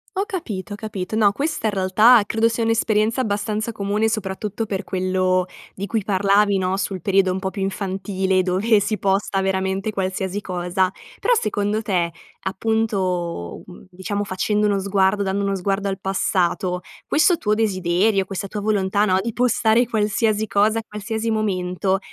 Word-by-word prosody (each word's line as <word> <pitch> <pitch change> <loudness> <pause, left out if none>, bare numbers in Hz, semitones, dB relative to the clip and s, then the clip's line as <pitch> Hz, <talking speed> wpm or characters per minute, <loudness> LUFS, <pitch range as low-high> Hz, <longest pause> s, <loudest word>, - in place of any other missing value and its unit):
Ho 390 - 0
capito, 215 - -5
ho - - -4
capito. 205 -1 -5
Ho 210 -2 +4
questa 280 -1 -2
in - - +1
realtà 210 +5 +5
credo 225 +2 +2
sia 230 0 -1
un'esperienza 225 +1 +1
abbastanza 215 0 -2
comune, 210 +1 0
soprattutto 210 +1 -3
per 200 -1 -3
quello 185 -1 0 0.3
di 195 - -5
cui 220 -4 -1
parlavi, 200 +1 +3
no, 185 0 0
sul 195 -2 -3
periodo 195 -1 +2
un 185 - -2
po' 190 0 -2
più 195 +1 -6
infantile 190 0 -1
dove 200 +4 +2
si 215 +1 -1
posta 195 0 0
veramente 190 +2 -1
qualsiasi 190 +1 -2
cosa. 185 0 -1 0.3
Però - - +2
secondo 210 +1 -1
te, 180 -5 0 0.3
appunto, 190 - -1
mhmm, 180 - -13
diciamo 195 +3 -3
facendo 210 +2 0
uno 200 -1 +1
sguardo 200 +1 +2
dando 200 +1 -1
uno 195 - 0
sguardo 195 +1 -1
al 195 - -2
passato, 185 -1 0 0.3
questo 315 +3 +4
tuo 210 - 0
desiderio, 195 -1 +1
questa 195 0 -5
tua 210 - -4
volontà, 205 -1 +1
no, 185 -2 +2
di 230 +3 -3
postare 240 -1 +2
qualsiasi 215 -1 +1
cosa 215 +2 +2
a - - -7
qualsiasi 220 +2 -3
momento, 190 -2 0
200 Hz, 165 wpm, -21 LUFS, 190-215 Hz, 0.3 s, realtà